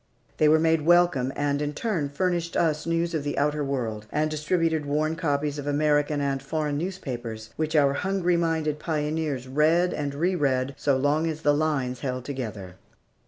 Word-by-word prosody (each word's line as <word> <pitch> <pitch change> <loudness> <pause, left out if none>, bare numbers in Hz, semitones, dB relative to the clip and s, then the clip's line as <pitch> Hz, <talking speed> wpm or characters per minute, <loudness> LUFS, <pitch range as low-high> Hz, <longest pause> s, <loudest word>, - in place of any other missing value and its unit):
They 155 - +4
were 155 - +6
made 160 0 +2
welcome, 170 -6 +3
and 145 0 0
in 150 0 -2
turn 165 -6 -1
furnished 170 +2 -1
us 155 -1 +1
news 165 +1 0
of 155 -3 -1
the 145 - -3
outer 150 +1 +1
world, 115 -6 -3
and 155 +1 0
distributed 160 0 0
worn 155 +2 0
copies 145 -3 -1
of 145 - -6
American 145 0 +2
and 135 -1 -1
foreign 150 -2 -2
newspapers, 120 - -5
which 155 0 -2
our 140 -2 +4
hungry 180 +2 0
minded 160 -3 0
pioneers 150 -4 -2
read 160 +6 +2
and 145 -1 -3
re 175 +6 +1
read 135 -5 0
so 140 -1 +1
long 145 +4 +1
as 160 0 -4
the 145 - +4
lines 145 -5 0
held 125 -1 -4
together. 110 -9 -6
150 Hz, 175 wpm, -26 LUFS, 140-160 Hz, -, were